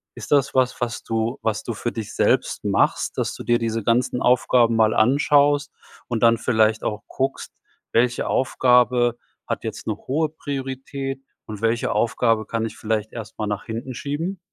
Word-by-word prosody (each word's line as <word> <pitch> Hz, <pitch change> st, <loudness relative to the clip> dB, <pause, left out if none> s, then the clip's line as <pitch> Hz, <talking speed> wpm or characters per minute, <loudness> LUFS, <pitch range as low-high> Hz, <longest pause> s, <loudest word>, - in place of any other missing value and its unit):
Ist -, -, -9 dB
das 140 Hz, -2 st, +3 dB
was, 130 Hz, -1 st, +1 dB
was 115 Hz, -2 st, -3 dB
du 115 Hz, +3 st, -1 dB
was 110 Hz, -2 st, 0 dB
du 115 Hz, -, -4 dB
für 120 Hz, +3 st, -3 dB
dich 110 Hz, -3 st, -6 dB
selbst -, -, +1 dB
machst, -, -, +1 dB
dass -, -, -1 dB
du -, -, -8 dB
dir 120 Hz, 0 st, +2 dB
diese 115 Hz, -1 st, -2 dB
ganzen 125 Hz, +3 st, +1 dB
Aufgaben 120 Hz, -1 st, +3 dB
mal 110 Hz, -1 st, +3 dB
anschaust 145 Hz, +4 st, +3 dB, 0.4 s
und 120 Hz, -1 st, -2 dB
dann 115 Hz, -1 st, +5 dB
vielleicht 110 Hz, -2 st, +2 dB
auch 105 Hz, -1 st, -3 dB
guckst, 135 Hz, +1 st, -3 dB, 0.4 s
welche 120 Hz, +2 st, +1 dB
Aufgabe 125 Hz, -2 st, +3 dB, 0.3 s
hat -, -, -3 dB
jetzt -, -, -6 dB
'ne -, -, 0 dB
hohe 155 Hz, +3 st, -1 dB
Priorität 135 Hz, -2 st, -5 dB, 0.2 s
und 105 Hz, -1 st, -8 dB
welche 115 Hz, +1 st, +1 dB
Aufgabe 115 Hz, 0 st, +1 dB
kann 115 Hz, -1 st, -1 dB
ich 110 Hz, -, -7 dB
vielleicht 110 Hz, -1 st, -2 dB
erst 110 Hz, -2 st, -8 dB
mal 105 Hz, -, -2 dB
nach 105 Hz, -1 st, -3 dB
hinten 120 Hz, +3 st, -5 dB
schieben? 160 Hz, +9 st, -4 dB
120 Hz, 175 wpm, -22 LUFS, 110-135 Hz, 0.4 s, dann